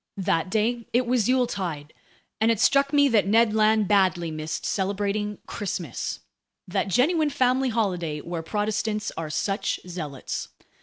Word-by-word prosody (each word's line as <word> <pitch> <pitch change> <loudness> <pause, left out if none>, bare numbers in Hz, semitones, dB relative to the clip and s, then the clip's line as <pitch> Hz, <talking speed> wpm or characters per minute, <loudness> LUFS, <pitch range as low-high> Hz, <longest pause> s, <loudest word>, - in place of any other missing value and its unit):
That 185 -2 0
day 225 +3 0
it 245 +2 +3
was 240 -2 +1
yuletide, 190 - -1 0.5
and 220 +1 +3
it 230 -3 +2
struck 275 +3 +4
me 285 -1 +5
that 215 -5 +3
Ned 220 +1 +4
Land 215 -1 +3
badly 185 -5 +2
missed 155 +1 -4
celebrating 205 +1 -1
"Christmas," 175 - -4 0.5
that 190 +1 -1
genuine 300 - +2
family 260 -1 +2
holiday 180 -9 -1
where 170 +2 -5
Protestants 210 +3 -2
are 160 -1 -4
such 195 +6 -1
zealots. 155 -6 -5
210 Hz, 140 wpm, -25 LUFS, 180-235 Hz, 0.5 s, me